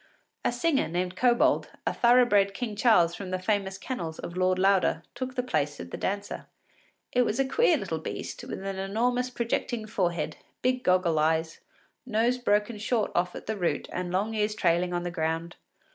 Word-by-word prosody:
A - - +2
singer, 270 +4 +1
named 180 +2 -2
Kobold, 240 +3 +3 0.2
a - - +1
thorough 245 +1 +5
bred 200 -3 +3
King 225 -3 -3
Charles 190 -7 +4
from 185 +1 -6
the 185 - -1
famous 195 0 -1
kennels 175 -9 -5
of 170 - -7
Lord 185 0 +2
Lauder, 190 -3 +3
took 255 +1 -5
the 250 - 0
place 145 - -1
of 85 0 -8
the - - -4
dancer. 200 +1 -3 0.6
It 250 - +3
was 240 0 0
a 270 - +3
queer 470 - +3
little - - -3
beast, - - -6
with - - -6
an 195 -1 -3
enormous 245 +6 0
projecting 235 -1 -2
forehead, 175 -7 -1 0.3
big 255 0 +1
goggle 180 -3 +3
eyes, 160 +1 +1 0.4
nose 240 0 +1
broken 210 -1 +1
short 220 +1 0
off 180 0 0
at - - -8
the 220 - -2
root, 175 -3 -1
and 180 -1 -3
long 200 +5 0
ears 210 -1 0
trailing 175 -1 +2
on 175 0 -1
the 175 - -3
ground. 165 +1 -2
200 Hz, 190 wpm, -28 LUFS, 175-240 Hz, 0.6 s, thorough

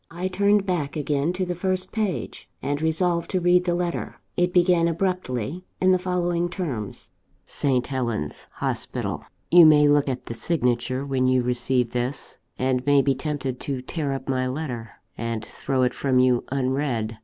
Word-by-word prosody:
I 175 +2 -3
turned 200 +2 +3
back 170 -7 -1
again 145 +1 0
to 185 0 -1
the 180 - -2
first 185 +1 -2
page, 210 -6 -3
and 145 +2 -2
resolved 170 +1 +1
to 185 - 0
read 180 0 +4
the 175 -1 +1
letter. 175 -1 -2 0.2
It 175 0 +2
began 175 -1 +4
abruptly, 170 - -2 0.2
in 185 0 +4
the 185 - +4
following 175 -1 0
terms: 140 - -4 0.3
"St. 130 -3 0
Helen's 120 - -3
Hospital. - - -3 0.3
"You 175 -2 +9
may 150 -1 +6
look 145 -1 +3
at 130 -1 -4
the - - -5
signature 125 -2 0
when 130 -2 +1
you 130 -1 +3
receive 125 0 0
this, 125 +2 -4 0.2
and 130 -1 0
may 140 -1 +5
be 135 - +3
tempted 135 -2 -3
to 135 -3 -4
tear 145 0 -3
up 135 -1 -6
my 130 -1 0
letter, 130 -5 -4 0.3
and 115 -2 -3
throw 130 -2 -1
it 125 -1 +1
from 130 -2 +1
you 125 -1 +3
unread. 130 -5 -1
145 Hz, 170 wpm, -24 LUFS, 130-175 Hz, 0.3 s, You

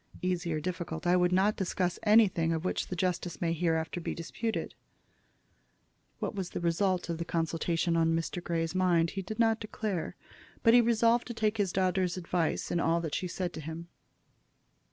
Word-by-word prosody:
"Easy 180 -2 -1
or 155 - 0
difficult. 170 -1 -4
I 175 +1 +4
would 180 0 +3
not 195 +3 +3
discuss 180 -1 -1
anything 210 -7 +4
of 160 +2 -3
which - - -1
the 180 - -4
justice 175 -3 -2
may 165 -1 0
hereafter 165 0 -1
be - - -3
disputed." 220 +7 -3 1.4
What - - -3
was 190 -4 -4
the - - -4
result 175 +2 +1
of 170 -1 -3
the - - -1
consultation 165 +1 0
on 165 0 +3
Mr. 165 +1 -3
Grey's 165 -1 -1
mind 175 -3 +2
he 195 - -3
did 215 +3 -6
not 225 -1 +3
declare, 210 -4 -3 0.5
but 230 - +6
he 245 - +8
resolved 235 +1 +3
to 240 - -6
take 215 0 0
his 200 -4 +1
daughter's 185 -1 +1
advice 175 -2 -1
in 175 - +1
all 165 0 +2
that 160 -3 -4
she 180 - -1
said 180 0 -3
to 160 - -6
him. 160 +2 -7
175 Hz, 185 wpm, -30 LUFS, 165-195 Hz, 1.4 s, he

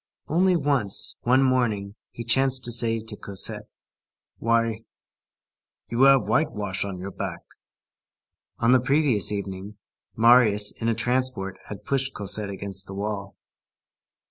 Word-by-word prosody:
Only 180 +3 +2
once, 140 - 0
one 130 +3 +3
morning, 115 -6 0 0.2
he 120 - -8
chanced 130 +2 +2
to 120 - +1
say 115 -1 +1
to 110 -1 -9
Cosette: 100 -2 -3 0.7
"Why, 115 -1 +1 1.1
you 120 +2 0
have 135 -1 +6
whitewash 105 -10 -1
on 100 -2 -5
your 95 +2 -7
back!" - - -5 1.2
On 115 - +2
the 130 - +6
previous 130 - +1
evening, 100 0 -6 0.4
Marius, 110 -3 +5
in 115 - 0
a 115 - +1
transport, 120 -5 -1
had 105 - -9
pushed 135 -1 -1
Cosette 100 +1 +1
against 95 -1 -4
the 95 - -8
wall. 100 -1 -5
115 Hz, 130 wpm, -24 LUFS, 100-130 Hz, 1.2 s, have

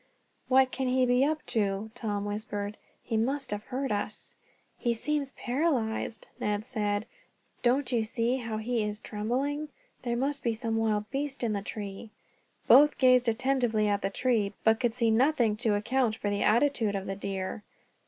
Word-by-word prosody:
"What 260 0 +4
can 265 -1 -2
he 255 0 +3
be 250 +1 +3
up 305 +2 0
to?" 205 0 -1
Tom 210 -4 -3
whispered. 205 0 -3 0.3
"He 225 - -1
must 270 +4 -1
have 210 0 -4
heard 270 -1 -3
us." 210 +1 -4 0.5
"He 240 -2 +1
seems 285 +3 -1
paralyzed," 240 -6 -1
Ned 210 +1 -1
said. 210 -4 -1 0.6
"Don't 255 +2 +2
you 235 -3 +2
see 230 +3 0
how 225 -3 -4
he 230 +1 -1
is 210 0 -2
trembling? 270 +9 -2 0.3
There 240 -1 -1
must 280 +3 0
be 230 -2 0
some 225 0 -2
wild 215 -2 0
beast 280 -1 -3
in 225 -2 +1
the 200 - -1
tree." 205 +1 -6 0.6
Both 295 +1 +7
gazed 255 -2 +5
attentively 240 -3 +1
at 205 -1 +1
the 195 - 0
tree, 215 -2 0
but 220 0 +4
could 240 -2 0
see 230 -2 +2
nothing 240 -2 +3
to 220 -2 +1
account 230 +2 +1
for 205 -2 -2
the 200 - -1
attitude 230 -2 +2
of 195 -1 -3
the 195 - -3
deer. 195 +1 -4
230 Hz, 175 wpm, -29 LUFS, 210-260 Hz, 0.6 s, Both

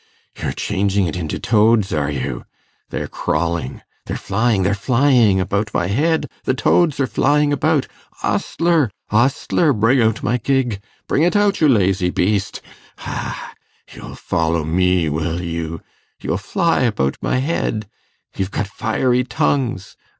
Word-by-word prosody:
you're - - -1
changing 100 -1 0
it 85 - -3
into 80 -4 -3
toads, 110 -1 +2
are 75 -2 0
you? 65 -3 -4 0.5
They're - - -4
crawling... 80 -3 -2 0.2
they're - - -3
flying... 110 0 0
they're 100 +2 +2
flying 120 -2 +3
about 100 +3 -1
my - - +1
head... 155 - +1 0.2
the 130 - 0
toads 150 +3 +2
are 135 - +3
flying 145 +2 +2
about. 150 -1 +1 0.4
Ostler! 165 -7 +1 0.2
ostler! 135 +7 +2
bring 120 +4 +3
out 110 -1 +1
my 120 +3 +1
gig... 125 -4 0 0.3
bring - - +1
it 175 +5 +2
out, 205 -2 +2
you 155 - +6
lazy 95 -6 +2
beast... 100 +2 -1 0.4
ha! - - -6 0.4
you'll - - -10
follow 80 0 -1
me, 90 +1 +2
will 80 +3 -2
you?... 85 -1 -4 0.4
you'll - - -2
fly 170 - 0
about 85 - 0
my - - 0
head... 130 -7 -1 0.5
you've 95 -1 -2
got 105 - -2
fiery 120 +5 0
tongues 125 -6 -1
105 Hz, 145 wpm, -19 LUFS, 90-135 Hz, 0.5 s, you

